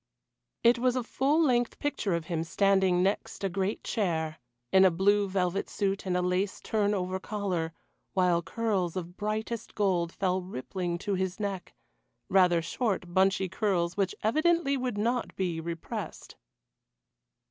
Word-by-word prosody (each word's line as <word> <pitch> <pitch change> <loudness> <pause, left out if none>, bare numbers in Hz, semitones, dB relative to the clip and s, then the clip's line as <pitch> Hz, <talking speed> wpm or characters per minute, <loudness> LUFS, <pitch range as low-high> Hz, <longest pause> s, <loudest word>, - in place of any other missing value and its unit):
It 235 0 +5
was 250 0 +2
a 255 - 0
full 275 +6 +1
length 245 -4 +2
picture 215 -10 -1
of 170 -1 -3
him 165 -1 -2
standing 190 +1 +3
next 200 +1 -1
a 195 - +1
great 190 +3 -2
chair, 160 -7 -1 0.3
in 190 - +6
a 190 - +7
blue 200 +3 +2
velvet 185 0 0
suit 195 -1 -1
and 180 -1 +1
a 180 - 0
lace 185 +2 0
turn 210 -1 0
over 185 0 -2
collar, 185 -6 -2 0.4
while 180 -3 +3
curls 190 -2 -1
of 175 -1 -5
brightest 220 +2 -3
gold 180 -5 +1
fell 185 -1 0
rippling 180 +1 -4
to 200 +3 -3
his 190 0 -2
neck 195 -3 -4 0.5
rather 180 -3 +4
short 185 -2 -2
bunchy 190 0 +3
curls 180 -2 0
which 195 -2 0
evidently 310 +5 +2
would 250 -5 -2
not 235 +3 -1
be 175 -4 -1
repressed. 165 0 -6
190 Hz, 150 wpm, -29 LUFS, 180-210 Hz, 0.5 s, a